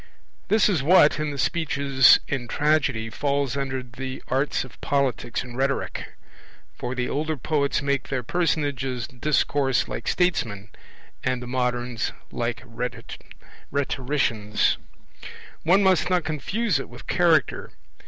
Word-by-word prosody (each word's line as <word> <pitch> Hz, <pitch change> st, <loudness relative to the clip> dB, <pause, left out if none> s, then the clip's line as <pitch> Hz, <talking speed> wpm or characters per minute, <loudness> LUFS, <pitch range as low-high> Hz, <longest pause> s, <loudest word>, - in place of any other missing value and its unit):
This 215 Hz, 0 st, +4 dB
is 180 Hz, -9 st, +1 dB
what, 150 Hz, -1 st, +5 dB
in 155 Hz, -1 st, -1 dB
the 145 Hz, -, -5 dB
speeches 140 Hz, -4 st, +4 dB
in 130 Hz, -4 st, -3 dB
Tragedy, 140 Hz, -6 st, +1 dB
falls 140 Hz, +1 st, -1 dB
under 135 Hz, -2 st, -2 dB
the 130 Hz, +2 st, -7 dB
arts 135 Hz, +3 st, 0 dB
of 130 Hz, -, -14 dB
Politics 135 Hz, -4 st, 0 dB
and 125 Hz, -2 st, -10 dB
Rhetoric; 135 Hz, +1 st, -2 dB, 0.6 s
for 125 Hz, +1 st, -5 dB
the 125 Hz, -1 st, -1 dB
older 155 Hz, +2 st, -2 dB
poets 140 Hz, +1 st, 0 dB
make 140 Hz, -2 st, 0 dB
their 130 Hz, -3 st, -2 dB
personages 135 Hz, -5 st, -1 dB
discourse 135 Hz, 0 st, +1 dB
like -, -, -6 dB
statesmen, 110 Hz, -, 0 dB, 0.5 s
and 130 Hz, -1 st, 0 dB
the 125 Hz, -, -7 dB
moderns 125 Hz, -1 st, -1 dB, 0.2 s
like 115 Hz, -2 st, -3 dB
rhetoricians. 125 Hz, 0 st, -2 dB, 0.8 s
One 190 Hz, +5 st, +4 dB
must 185 Hz, -4 st, +3 dB
not 180 Hz, -2 st, +2 dB
confuse 170 Hz, +4 st, -1 dB
it -, -, -7 dB
with 120 Hz, +1 st, -12 dB
Character. 170 Hz, -4 st, +2 dB
135 Hz, 125 wpm, -24 LUFS, 125-150 Hz, 0.8 s, what